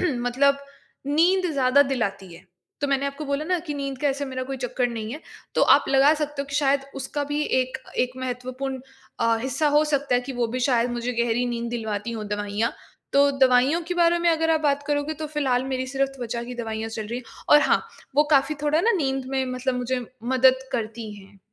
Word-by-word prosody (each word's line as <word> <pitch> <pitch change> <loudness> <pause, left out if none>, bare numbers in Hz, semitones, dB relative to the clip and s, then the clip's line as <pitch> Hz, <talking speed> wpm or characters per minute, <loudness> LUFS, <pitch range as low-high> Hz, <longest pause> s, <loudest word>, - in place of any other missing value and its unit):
मतलब 275 -2 +2 0.5
नींद 355 +6 +3
ज़्यादा 270 0 +4
दिलाती 200 -10 -3
है। 170 - -14 0.4
तो 285 - +1
मैंने 275 0 +1
आपको 280 +2 -5
बोला 280 +2 -2
ना 360 +2 +1
कि 295 - -3
नींद 275 -2 -4
का 290 - +1
ऐसा 280 +1 -2
मेरा 260 -1 -4
कोई 270 +1 -5
चक्कर 250 0 0
नहीं 225 -1 -5
है 305 - -7 0.3
तो - - +3
आप - - +3
लगा 275 +2 +5
सकते 295 -2 -3
हो - - -10
कि 280 - -7
शायद 280 -1 +3
उसका 275 +2 -3
भी 290 +1 -1 0.2
एक 255 +1 -3 0.3
एक 250 +1 -11
महत्वपूर्ण 255 +1 -4 0.4
अ, 230 0 +3
हिस्सा 270 +4 0
हो 300 - +5
सकता 285 -3 0
है 245 - +3
कि 270 +2 -6
वो 235 - +3
भी 255 - -1
शायद 245 -2 +2
मुझे 240 +1 -2
गहरी 240 +1 +1
नींद 235 -1 -3
दिलवाती 220 -1 -3
हो 220 -2 -5
दवाइयाँ। 205 +2 -1 0.4
तो 280 0 +5
दवाइयों 265 +5 +4
के 360 - -1
बारे 345 0 +3
में 340 0 +2
अगर 325 0 +1
आप 315 -1 +3
बात 285 -1 +1
करोगे 290 +1 -1
तो 310 +1 -5
फ़िलहाल 260 -3 +1
मेरी 260 -1 -2
सिर्फ़ 270 +1 0
त्वचा 235 -1 -4
की 245 +1 -7
दवाइयाँ 225 -2 -4
चल 220 -1 -5
रही 240 +3 -4
हैं 250 - -11 0.3
और 295 - +8
हाँ, - - +3 0.3
वो 295 - +7
काफ़ी 285 +1 +4
थोड़ा 300 +2 +2
ना 465 - +3
नींद 270 -4 -1
में 265 -1 0
मतलब 255 0 -1
मुझे 250 0 -2 0.2
मदद 260 +1 +3
करती 225 -2 -4
हैं। 195 0 -15
265 Hz, 215 wpm, -24 LUFS, 240-285 Hz, 0.5 s, और